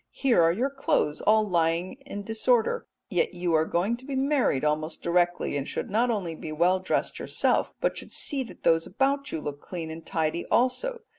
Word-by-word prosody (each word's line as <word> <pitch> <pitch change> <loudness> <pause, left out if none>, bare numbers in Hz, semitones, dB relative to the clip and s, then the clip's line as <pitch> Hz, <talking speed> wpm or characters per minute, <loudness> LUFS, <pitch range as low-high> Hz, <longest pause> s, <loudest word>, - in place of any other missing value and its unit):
Here 255 -9 +2
are 165 0 +5
your 250 +10 -1
clothes 270 - 0
all 215 0 +4
lying 170 0 +1
in 205 -7 -5
disorder, 225 +2 +1 0.2
yet 180 -1 0
you 175 -1 -1
are 160 0 +4
going 190 +9 0
to 250 - -15
be 275 -1 -4
married 265 - +1
almost 155 +2 -1
directly, 175 -2 +1
and 140 -1 -2
should - - -4
not 235 +4 +2
only 195 -8 -1
be 155 0 -7
well 175 +4 +3
dressed 185 - -1
yourself, - - +1
but - - 0
should - - -9
see 280 -2 -1
that - - -14
those 165 0 +3
about 275 +7 0
you 160 - -2
look 145 -1 -6
clean 165 -3 -6
and 160 +1 -8
tidy 160 +1 -2
also. 470 - +1
180 Hz, 200 wpm, -27 LUFS, 165-245 Hz, 0.2 s, are